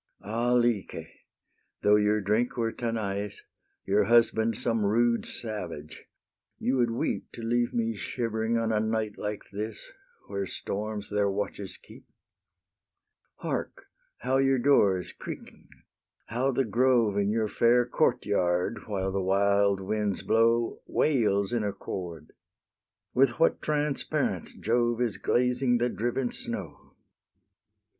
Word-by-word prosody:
Ah 115 +4 0
Lyce! 120 -9 +1 0.8
though 105 0 +6
your 105 0 +2
drink 110 +6 0
were 115 -1 0
Tanais, 105 -4 -3 0.5
Your 100 +1 +3
husband 115 0 +3
some 115 -2 0
rude 115 +3 +2
savage, 90 -9 -6 0.5
you 130 +1 0
would 120 -2 +3
weep 115 - -2
To 115 - -8
leave 120 +1 +1
me 115 -1 -1
shivering, 115 +1 -1
on 115 -1 0
a 110 - +2
night 110 -1 -1
like 105 0 -4
this, 105 +2 -6 0.3
Where 100 -1 -3
storms 105 +2 -4
their 100 -1 +2
watches 100 0 -4
keep. - - -16 1.3
Hark! - - -4 0.3
how 130 +2 0
your 135 0 +3
door 120 -7 +4
is 90 - -6
creaking! - - -9 0.6
how 125 +4 0
the 135 +1 +1
grove 115 -1 +3
In 100 0 +1
your 110 0 +1
fair 120 +3 +3
court - - +1
yard, 90 +5 0
while 95 -2 -2
the 95 0 -1
wild 100 +1 +3
winds 105 0 -1
blow, 115 +1 +2
Wails 105 -8 +2
in 115 -3 +1
accord! 90 -5 -5 0.8
with 125 -2 +3
what 165 - +3
transparence 150 -2 -1
Jove 120 +1 +1
Is 120 -5 0
glazing 125 0 +2
the 120 +1 +1
driven 120 +4 -1
snow! - - -7
110 Hz, 130 wpm, -28 LUFS, 100-120 Hz, 1.3 s, though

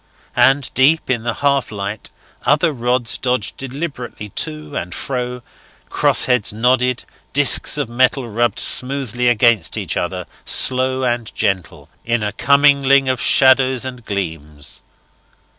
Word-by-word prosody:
And 130 +1 +2
deep 140 +2 +2
in 120 -3 -1
the 120 0 -3
half 140 -3 +1
light 100 0 -6 0.3
other 150 +5 +2
rods 120 -1 -1
dodged 125 -5 -2
deliberately 135 -5 -7
to 75 -4 -5
and 90 +1 -5
fro, 125 -2 -4 0.5
crossheads 125 -4 +2
nodded, 125 +3 0 0.3
discs 145 +1 +5
of 145 -4 -2
metal 125 +2 0
rubbed 115 0 -1
smoothly 125 -2 +1
against 115 -7 +2
each - - -3
other, 90 0 -3 0.2
slow 130 0 +2
and 120 -2 -2
gentle, 95 -5 -3 0.2
in 115 -1 -1
a 105 - -2
commingling 140 +1 +3
of 130 -1 -1
shadows 130 -1 +4
and 125 -2 -8
gleams. 80 -8 -6
125 Hz, 125 wpm, -18 LUFS, 110-130 Hz, 0.5 s, discs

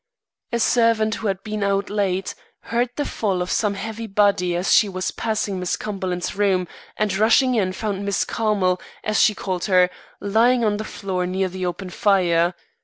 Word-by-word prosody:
"A 235 - 0
servant 230 -2 +2
who 215 - -3
had 195 -1 -2
been 215 -1 -4
out 200 0 0
late, 195 -2 -1 0.4
heard 240 +1 +2
the 290 - -2
fall 195 -4 -1
of 180 0 -2
some 210 -2 +1
heavy 220 +3 -5
body 195 -3 +2
as 180 +2 +1
she 210 - +5
was 185 0 -3
passing 215 -4 -2
Miss 180 -1 -1
Cumberland's 185 -4 -4
rooms, 190 -4 +1 0.3
and 215 -2 0
rushing 230 +5 +4
in 195 -6 +1
found 200 0 -3
Miss 200 -1 0
Carmel, 200 -5 0 0.2
as 215 0 +1
she 215 - +4
called 185 -2 -3
her, 180 -2 +4 0.3
lying 230 +4 +3
on 205 -1 +1
the 215 - -4
floor 185 -4 -3
near 190 +1 -1
the 185 0 -3
open 180 +1 -5
fire. 175 -4 +2
200 Hz, 180 wpm, -22 LUFS, 185-215 Hz, 0.4 s, she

